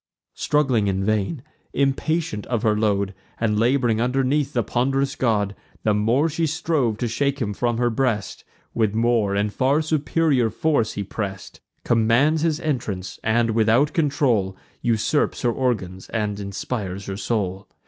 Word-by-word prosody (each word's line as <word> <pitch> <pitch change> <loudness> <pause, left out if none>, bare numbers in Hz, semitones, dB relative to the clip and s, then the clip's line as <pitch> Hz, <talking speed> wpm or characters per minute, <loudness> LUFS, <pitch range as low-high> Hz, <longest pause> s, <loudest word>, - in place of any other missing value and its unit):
Struggling 130 -8 +1
in 95 0 0
vain, 110 +6 -1 0.3
impatient 140 -4 0
of 120 -2 -1
her 110 -2 +3
load, 100 -2 0 0.3
And 105 -2 +1
lab'ring 120 -2 +2
underneath 135 +3 +1
the 120 - +1
pond'rous 135 +5 0
god, 105 -5 +1 0.3
The 105 - +3
more 115 +9 +2
she 160 +1 -1
strove 150 -8 0
to 120 - -1
shake 140 +5 0
him 105 -5 -1
from 120 +2 -1
her 120 0 +1
breast, 115 -4 -1 0.3
With 110 -2 +1
more 115 -3 +2
and 105 +1 0
far 135 +6 +2
superior 150 -4 +1
force 115 -1 0
he 100 - -3
press'd; 95 -1 -6 0.2
Commands 120 +7 +3
his 160 -1 +1
entrance, 105 - -3
and, 115 +1 +2
without 115 +6 +3
control, 135 - +1 0.2
Usurps 120 +6 0
her 120 - +3
organs 105 -8 -2
and 105 -2 -2
inspires 100 -1 -4
her 95 - -4
soul. 100 -2 -2
115 Hz, 150 wpm, -23 LUFS, 105-135 Hz, 0.3 s, her